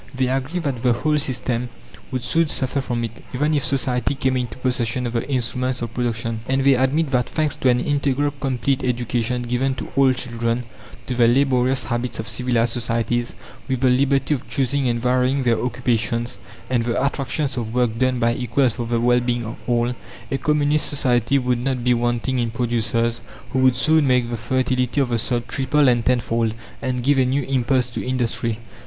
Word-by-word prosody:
They 130 -1 +1
agree 135 +7 -1
that 135 -7 -3
the 125 -1 +3
whole 150 +5 +1
system 125 -3 -1 0.4
would 130 -2 -3
soon 165 +6 +2
suffer 135 -1 -1
from 120 -3 -2
it, 115 0 -6
even 150 +4 +1
if 145 -3 +1
Society 130 -1 0
came 130 -1 0
into 125 -2 -3
possession 125 -1 -1
of 120 - -3
the 120 +4 -2
instruments 125 -1 -1
of 115 -1 -5
production. 115 -2 -2
And 135 0 +2
they 140 0 +6
admit 135 +4 +1
that, 125 -2 +1
thanks 155 -2 0
to 130 - +2
an 125 0 +3
"integral" 145 +1 0
complete 135 -1 -1
education 120 -1 -1
given 125 +2 0
to - - -6
all 135 -1 +5
children, 115 -1 -2 0.4
to 125 - -3
the 120 -1 +4
laborious 130 0 +2
habits 120 +2 -2
of 110 - -4
civilized 120 -2 0
societies, 120 0 -1 0.3
with 130 -2 -1
the 130 -2 +4
liberty 135 +3 +2
of 135 -3 -5
choosing 140 -1 0
and 120 0 0
varying 130 +2 +1
their 120 -2 +1
occupations 120 -1 -1 0.3
and 120 -3 +1
the 120 +3 0
attractions 140 0 -1
of 115 -3 -3
work 120 -2 0
done 130 -1 +2
by 115 -1 +2
equals 125 +1 +1
for 120 -1 -4
the 115 0 0
well 120 +1 +4
being 120 -1 -1
of 110 - -6
all, 120 0 +1 0.4
a 135 - 0
Communist 150 0 +1
society 125 -2 +1
would 125 -2 0
not 125 -1 -2
be 125 0 +4
wanting 120 +2 0
in 120 -1 0
producers 115 0 0 0.3
who 130 - 0
would 130 -1 +4
soon 155 -1 +3
make 125 -2 +2
the 120 - -2
fertility 125 +2 0
of 135 -3 +1
the 120 -1 +1
soil 120 +2 0
triple 135 +3 +2
and 120 -2 +3
tenfold, 115 -2 +1 0.3
and 125 -2 -2
give 140 +1 +3
a - - +5
new 135 +2 0
impulse 130 -1 +1
to - - -4
industry. 120 -3 -1
125 Hz, 195 wpm, -22 LUFS, 120-135 Hz, 0.4 s, they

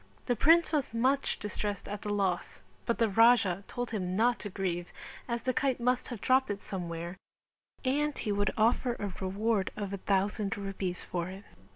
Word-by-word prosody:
The 245 - +1
prince 330 +7 +5
was 280 -7 0
much 265 +4 +2
distressed 205 -1 -3
at 205 0 -5
the 210 - -4
loss 195 -3 -1 0.2
but 235 - +1
the 230 - +3
Raja 205 -3 +4
told 245 -1 -4
him 185 -4 -2
not 230 +1 +3
to 205 - -5
grieve 180 -3 -3 0.4
as 235 -1 -2
the 255 - +1
kite 265 -2 +1
must 250 +1 +1
have 240 -4 -6
dropped 260 +1 +3
it 200 -1 -3
somewhere 170 -1 -5 0.7
and 290 +2 +1
he 210 - -2
would 205 0 +2
offer 235 +3 +3
a 205 -4 -4
reward 200 +1 0
of 200 -2 -3
a - - -2
thousand 200 +1 0
rupees 195 -2 -3
for 175 -1 -2
it. 190 +2 -8
205 Hz, 185 wpm, -31 LUFS, 190-245 Hz, 0.7 s, prince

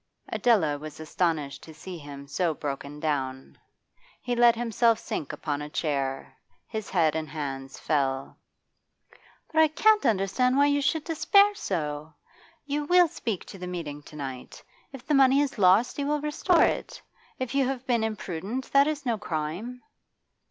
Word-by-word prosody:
Adela 160 -12 +2
was 155 0 -9
astonished 155 -3 -1
to 160 - -12
see 180 +3 -8
him 140 -1 -10
so 160 +3 0
broken 145 0 -5
down. 135 -4 -3 0.6
He 245 -1 -2
let 240 -1 +6
himself 230 -1 +2
sink 150 - -4
upon 145 -2 -3
a 150 - -6
chair; 135 -4 -2 0.3
his 220 -2 -5
head 160 -4 +2
and 160 -2 -3
hands 135 -3 -5
fell. 135 -3 -1 1.2
'But 315 - +5
I 315 - +6
can't 425 +8 +3
understand 225 +6 +2
why 285 - +5
you 285 0 +2
should 295 +3 +1
despair 400 +6 +4
so!' 155 - -4 0.5
she 285 0 -2
exclaimed. - - 0
'You - - -4
will 355 +2 +5
speak 225 - -4
to 195 - -11
the 180 - -6
meeting 160 -5 -5
to 150 - -14
night. 135 -3 -7 0.3
If 265 -2 -11
the 300 - 0
money 270 0 +5
is 285 -6 -1
lost 195 +8 +4
you 280 - -1
will 300 0 +1
restore 300 +4 +3
it. - - -1 0.4
If 255 -2 -4
you 275 -2 +2
have 265 -1 -4
been 235 -3 +1
imprudent, 215 +3 -4
that 280 +1 +5
is 295 -2 -3
no 230 -3 0
crime. 185 +9 -4
190 Hz, 170 wpm, -27 LUFS, -, 1.2 s, let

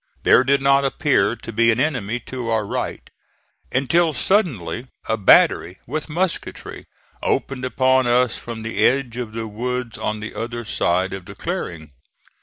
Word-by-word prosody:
There - - +6
did 140 +1 +2
not 140 0 +4
appear 135 -6 +1
to 115 0 -9
be 115 +1 +3
an 115 - 0
enemy 125 -6 -1
to 125 0 -6
our 110 -2 +1
right, - - -4 0.6
until 160 +5 +2
suddenly 130 - 0 0.2
a 110 - +1
battery 95 -3 +4
with 155 +5 -4
musketry 175 +3 -3 0.4
opened 130 -2 -1
upon 130 0 +2
us 120 -1 +3
from 115 -2 -7
the 115 - -1
edge 125 -3 +2
of 120 -3 -5
the 115 0 -4
woods 125 +2 -4
on 105 0 -2
the 105 +1 -7
other 120 0 -5
side 95 -2 0
of 95 -2 -7
the - - -10
clearing. 80 -3 -5
120 Hz, 160 wpm, -21 LUFS, 110-135 Hz, 0.6 s, There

